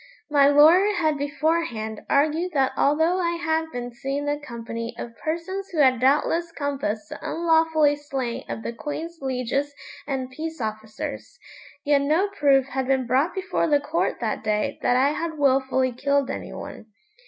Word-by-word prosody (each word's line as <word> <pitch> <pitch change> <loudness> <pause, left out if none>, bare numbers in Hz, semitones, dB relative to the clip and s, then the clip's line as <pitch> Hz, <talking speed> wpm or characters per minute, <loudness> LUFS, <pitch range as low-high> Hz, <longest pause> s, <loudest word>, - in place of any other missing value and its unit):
My 285 -1 +6
lawyer 330 +8 +6
had 315 -4 +1
beforehand 285 -7 -1
argued 315 +5 +1
that 270 -3 +2
although 320 +6 +2
I 340 -1 0
had 320 -1 0
been 245 -2 -5
seen 275 +4 -3
in - - -5
the - - -23
company 230 -2 -6
of 230 -1 -7
persons 345 +5 -3
who 340 - -7
had 260 -4 +4
doubtless 300 +6 +2
compassed 275 -9 -3
the - - -7
unlawfully 320 -3 +3
slaying 265 -4 -5
of 225 - -5
the 235 - -4
Queen's 320 +6 -6
lieges 270 +2 -2 0.3
and 260 -2 -3
peace 320 +3 -6
officers, 215 - -5 0.5
yet 285 -1 +4
no 315 +8 +2
proof 280 -9 +3
had 265 -1 -2
been 265 -1 +1
brought 265 +9 +1
before 380 -3 -1
the 295 -2 +3
court 300 +4 -1
that 220 -2 -2
day 210 -1 -1
that 245 - +2
I 270 +2 +4
had 320 +1 -4
wilfully 265 -2 +2
killed 280 +2 0
any - - -6
one. - - -9
285 Hz, 165 wpm, -24 LUFS, 255-320 Hz, 0.5 s, My